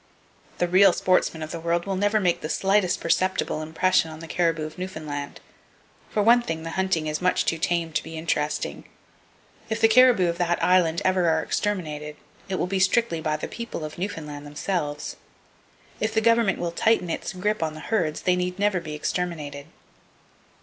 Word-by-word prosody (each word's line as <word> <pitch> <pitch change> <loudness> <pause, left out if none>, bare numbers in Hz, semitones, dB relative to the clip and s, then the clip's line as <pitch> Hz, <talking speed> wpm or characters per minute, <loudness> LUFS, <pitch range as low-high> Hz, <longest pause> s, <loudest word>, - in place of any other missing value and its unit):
The 175 - +1
real 185 +1 +6
sportsmen 175 -3 +1
of 155 - -6
the 170 - -5
world 170 +1 0
never 200 +2 +1
will 210 - 0
make 175 -2 +1
the 155 - -4
slightest 195 -1 +2
perceptible 185 -2 0
impression 160 +2 +1
on 155 0 -9
the 165 - -9
caribou 165 -2 0
of 155 +3 -9
Newfoundland. 155 -6 -5 0.7
For 210 - 0
one 235 +3 +6
thing, 165 -8 -4
the 165 - -5
hunting 190 -3 0
is 155 +1 -2
much 180 0 +2
too 165 - 0
tame 165 -1 -1
to - - +1
be 160 0 -8
interesting. 150 -2 -2 0.8
If 220 0 -1
the 225 - +6
caribou 230 -5 +5
of 170 +1 -2
that 175 -1 +1
Island 175 -2 +3
ever 185 -2 +3
are 160 0 +1
exterminated, 155 -7 -3 0.3
it 190 - -1
will 180 - 0
be 190 +1 -1
strictly 190 -2 +2
by 155 -1 -1
the - - -5
people 235 -9 -6
of 155 +2 -8
Newfoundland, 150 -6 -5
themselves. 150 0 -3 0.8
If 220 +1 -1
the - - +5
government 230 -2 +3
will 175 -1 -2
tighten 180 -1 +1
its - - -3
grip 210 +3 -1
on 155 -1 -2
the - - -8
herds, 160 -5 -1
they 180 - +3
need 180 0 -2
never 200 -2 +1
be 155 -3 -7
exterminated. 150 -3 -3
175 Hz, 185 wpm, -25 LUFS, 160-190 Hz, 0.8 s, real